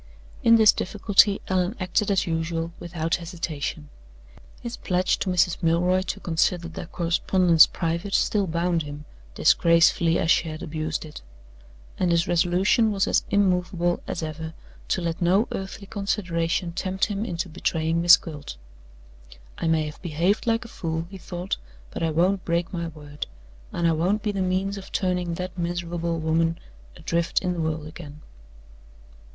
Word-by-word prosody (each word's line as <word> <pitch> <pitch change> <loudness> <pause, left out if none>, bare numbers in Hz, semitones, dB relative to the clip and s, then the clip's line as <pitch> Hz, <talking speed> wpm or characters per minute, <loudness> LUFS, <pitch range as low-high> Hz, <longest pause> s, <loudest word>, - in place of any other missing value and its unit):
In 230 - +6
this 220 -2 +7
difficulty 205 +1 +3
Allan 185 +3 0
acted 185 +3 0
as 195 -2 +2
usual, 165 0 -2
without 165 -1 -2
hesitation. 165 -4 -5 0.7
His 240 -1 -6
pledge 180 0 0
to 195 - -2
Mrs. 180 -1 +2
Milroy 175 +2 +2
to 195 +1 -4
consider 170 -1 0
their 165 0 -7
correspondence 170 -1 +4
private 170 +3 -2
still 200 -3 +2
bound 170 0 0
him, 145 0 -8 0.3
disgracefully 170 0 +4
as 165 - +2
she 165 - +2
had 155 +2 -7
abused 155 -1 -3
it. 150 - -10 0.8
And 180 - +2
his 170 0 +2
resolution 185 +6 +3
was 195 -2 +1
as - - +3
immovable 180 -3 +1
as 170 - -4
ever 160 +1 -6 0.3
to - - 0
let 170 +1 -3
no 190 +6 +3
earthly 195 +1 -6
consideration 180 -4 -1
tempt 190 +2 -1
him 205 -1 -3
into 175 -4 -3
betraying 165 0 -1
Miss 170 0 +9
Gwilt. 145 - -8 1.0
"I - - -1
may 160 -1 +2
have 150 0 -8
behaved 175 +6 0
like 230 0 +1
a - - -8
fool," 165 -6 -4
he 195 - -9
thought, 180 +1 -4 0.3
"but - - -6
I 165 - +1
won't 180 +4 +1
break 170 +1 -1
my 170 -1 -3
word; 150 -2 -8 0.4
and 170 - 0
I - - +4
won't 185 +6 0
be 210 - 0
the 195 -1 -2
means 190 +2 -1
of 190 - -12
turning 180 -2 -1
that 180 +1 -6
miserable 170 -1 -2
woman 165 +1 +1 0.4
adrift 170 +2 -1
in 180 -1 0
the 170 - -3
world 160 -1 -2
again." 155 -1 -10
175 Hz, 160 wpm, -25 LUFS, 165-185 Hz, 1.0 s, Miss